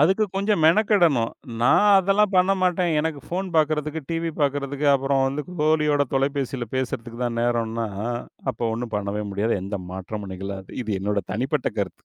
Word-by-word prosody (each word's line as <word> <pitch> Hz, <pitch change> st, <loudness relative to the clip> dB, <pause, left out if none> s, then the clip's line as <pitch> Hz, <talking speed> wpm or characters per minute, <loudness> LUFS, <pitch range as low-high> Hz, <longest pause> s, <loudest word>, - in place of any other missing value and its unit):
அதுக்கு 190 Hz, +8 st, +4 dB
கொஞ்சம் 200 Hz, -3 st, +1 dB
மெனக்கெடணும். 170 Hz, -, +4 dB, 0.3 s
"நான் 205 Hz, +11 st, +5 dB
அதெல்லாம் 195 Hz, +2 st, +2 dB
பண்ண 185 Hz, +2 st, +4 dB
மாட்டேன், 180 Hz, -1 st, +2 dB
எனக்கு 150 Hz, -2 st, -3 dB
போன் 185 Hz, +2 st, -2 dB
பாக்குறதுக்கு, 155 Hz, 0 st, +1 dB
டிவி 165 Hz, 0 st, -1 dB
பாக்குறதுக்கு, 145 Hz, 0 st, 0 dB
அப்பறம் 135 Hz, 0 st, +2 dB
வந்து 140 Hz, +3 st, -2 dB, 0.2 s
தோழியோட 150 Hz, -2 st, +3 dB
தொலைபேசியில 135 Hz, -2 st, -1 dB
பேசுறதுக்கு 120 Hz, -2 st, -4 dB
தான் 115 Hz, -1 st, -2 dB
நேரம்னா" 115 Hz, -1 st, 0 dB, 0.6 s
அப்ப 120 Hz, -1 st, -9 dB
ஒண்ணும் 115 Hz, -2 st, -5 dB
பண்ணவே 105 Hz, +1 st, -3 dB
முடியாது. 100 Hz, 0 st, 0 dB
எந்த 100 Hz, 0 st, -4 dB
மாற்றமும் 95 Hz, +1 st, -6 dB
நிகழாது, 95 Hz, 0 st, -7 dB
இது 110 Hz, -2 st, -3 dB
என்னோட 100 Hz, +1 st, 0 dB
தனிப்பட்ட 125 Hz, +5 st, -1 dB
கருத்து. -, -, -4 dB
140 Hz, 150 wpm, -24 LUFS, 115-160 Hz, 0.6 s, நான்